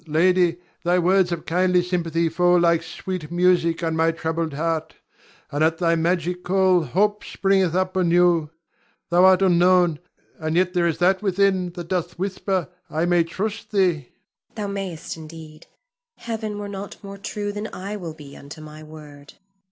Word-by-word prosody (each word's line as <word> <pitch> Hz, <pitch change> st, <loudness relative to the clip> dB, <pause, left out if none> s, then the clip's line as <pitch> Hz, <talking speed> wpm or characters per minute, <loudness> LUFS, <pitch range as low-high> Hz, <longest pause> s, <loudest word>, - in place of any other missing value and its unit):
Ion. 155 Hz, -, -9 dB
Lady, 175 Hz, +1 st, +3 dB, 0.3 s
thy 175 Hz, +1 st, +2 dB
words 180 Hz, +1 st, +3 dB
of 170 Hz, -1 st, -4 dB
kindly 180 Hz, +1 st, +2 dB
sympathy 170 Hz, -2 st, -1 dB
fall 175 Hz, +2 st, +3 dB
like 170 Hz, -1 st, +3 dB
sweet 170 Hz, -1 st, -6 dB
music 175 Hz, -1 st, +2 dB
on 165 Hz, -1 st, 0 dB
my 160 Hz, 0 st, +3 dB
troubled 165 Hz, -1 st, -2 dB
heart, 160 Hz, +1 st, -2 dB, 0.6 s
and 145 Hz, +2 st, 0 dB
at 160 Hz, +1 st, +2 dB
thy 170 Hz, -1 st, +2 dB
magic 175 Hz, +2 st, -1 dB
call 185 Hz, -1 st, +3 dB
hope 205 Hz, +8 st, 0 dB
springeth 190 Hz, -3 st, +1 dB
up 185 Hz, 0 st, 0 dB
anew. 175 Hz, -3 st, +3 dB, 0.6 s
Thou 175 Hz, +1 st, +5 dB
art 190 Hz, 0 st, +5 dB
unknown, 175 Hz, -3 st, +4 dB, 0.4 s
and 155 Hz, 0 st, -2 dB
yet 180 Hz, +1 st, +2 dB
there 175 Hz, -2 st, +2 dB
is 165 Hz, -, -1 dB
that 190 Hz, +2 st, +2 dB
within 195 Hz, -2 st, +1 dB
that 175 Hz, -1 st, -7 dB
doth 180 Hz, -1 st, -2 dB
whisper 190 Hz, -2 st, -2 dB, 0.2 s
I 160 Hz, +2 st, -1 dB
may 175 Hz, -1 st, +3 dB
trust 200 Hz, +6 st, -5 dB
thee. 190 Hz, -3 st, +3 dB
Zuleika. 150 Hz, -6 st, -10 dB, 0.5 s
Thou 210 Hz, -2 st, -3 dB
mayst 190 Hz, -6 st, -5 dB
indeed. 155 Hz, -1 st, -12 dB, 0.5 s
Heaven 220 Hz, -2 st, -5 dB
were 205 Hz, 0 st, -5 dB
not 200 Hz, 0 st, -7 dB
more 200 Hz, 0 st, -9 dB
true 205 Hz, 0 st, -4 dB
than 210 Hz, +1 st, -5 dB
I 200 Hz, +3 st, -6 dB
will 170 Hz, -6 st, -7 dB
be 145 Hz, -3 st, -12 dB
unto 140 Hz, +2 st, -11 dB
my 155 Hz, 0 st, -11 dB
word. 150 Hz, -2 st, -13 dB
175 Hz, 170 wpm, -23 LUFS, 165-190 Hz, 0.6 s, Thou